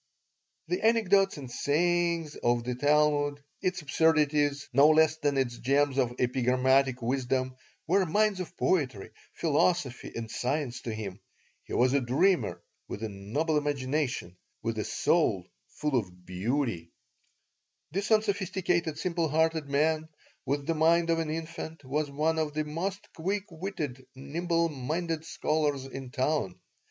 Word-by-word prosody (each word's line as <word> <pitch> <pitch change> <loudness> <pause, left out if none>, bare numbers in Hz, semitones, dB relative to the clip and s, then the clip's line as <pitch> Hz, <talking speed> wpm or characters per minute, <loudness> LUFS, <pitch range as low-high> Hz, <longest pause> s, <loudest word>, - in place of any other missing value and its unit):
The 360 - -1
anecdotes 200 -5 +3
and 130 -4 -8
sayings 170 +2 +1
of 120 0 +1
the 125 +1 -2
Talmud, 145 +1 +2 0.2
its 185 -2 -1
absurdities 150 -1 +2
no 140 +3 +7
less 155 0 +4
than 145 -3 0
its 120 -3 -1
gems 140 +1 +2
of 120 -2 +1
epigrammatic 130 +1 +2
wisdom, 130 +1 -1 0.3
were 190 +4 +3
mines 210 +3 +2
of 180 0 -6
poetry, 130 - 0 0.2
philosophy, 150 -4 +1
and 115 -1 -5
science 125 -2 -2
to 115 - -4
him. 105 -3 -6 0.5
He - - -8
was 125 +2 +3
a 140 - +3
dreamer 130 - +1 0.2
with 105 - -6
a 110 - -2
noble 135 +11 -1
imagination, 140 - -2 0.3
with 115 -1 -2
a 105 - -2
soul - - +1 0.2
full 150 -2 -2
of 90 -6 -3
beauty 95 - -2 1.0
This 195 +5 -2
unsophisticated, 190 -6 +1
simple 170 -3 -1
hearted 160 0 +1
man, 155 +2 +1 0.4
with 140 +1 -1
the 165 - +1
mind 165 +1 +3
of 165 - +2
an 160 -1 -2
infant, 160 -1 -6
was 145 +3 -1
one 155 +3 0
of 150 -2 -2
the 155 - +1
most 185 +6 -4
quick 190 +4 -1
witted, 160 -7 -5
nimble 165 +5 0
minded 160 +3 -3
scholars 150 -4 -1
in 135 -1 -7
town. 130 -7 -1
150 Hz, 140 wpm, -29 LUFS, 130-165 Hz, 1.0 s, no